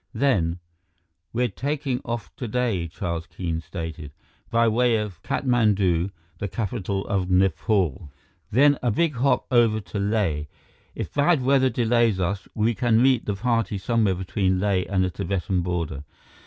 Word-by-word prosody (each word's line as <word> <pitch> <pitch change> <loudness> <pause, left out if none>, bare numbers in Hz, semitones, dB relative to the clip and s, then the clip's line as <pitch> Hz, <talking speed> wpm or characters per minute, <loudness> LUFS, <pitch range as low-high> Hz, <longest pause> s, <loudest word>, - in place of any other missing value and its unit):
Then: 105 -10 +1 0.7
"We're 125 +1 +1
taking 135 +4 -2
off 115 -2 -5
today," 115 -7 -1
Charles 85 -1 -4
Keene 80 -3 -4
stated, 80 -3 -7 0.4
"by 115 0 +3
way 120 +1 +3
of 105 -5 -5
Katmandu, 100 - +1 0.3
the 100 - -2
capital 100 -1 -3
of 95 -3 -1
Nepal. 95 -3 +1 0.4
Then 145 +5 +4
a 125 - +1
big 150 +5 +1
hop 135 +4 +2
over 115 -3 +4
to 105 0 -6
Leh. 100 -8 0 0.5
If - - -5
bad 145 -1 +3
weather 130 0 +4
delays 115 -4 +2
us, 95 +2 -2
we 110 +2 +2
can 115 +1 +2
meet 130 -1 +3
the 100 - -1
party 115 -2 0
somewhere 105 -1 +1
between 95 0 0
Leh 95 -2 +1
and 95 -1 +2
the 90 - -1
Tibetan 95 -1 -1
border. 85 -5 -3
105 Hz, 145 wpm, -24 LUFS, 90-120 Hz, 0.7 s, Then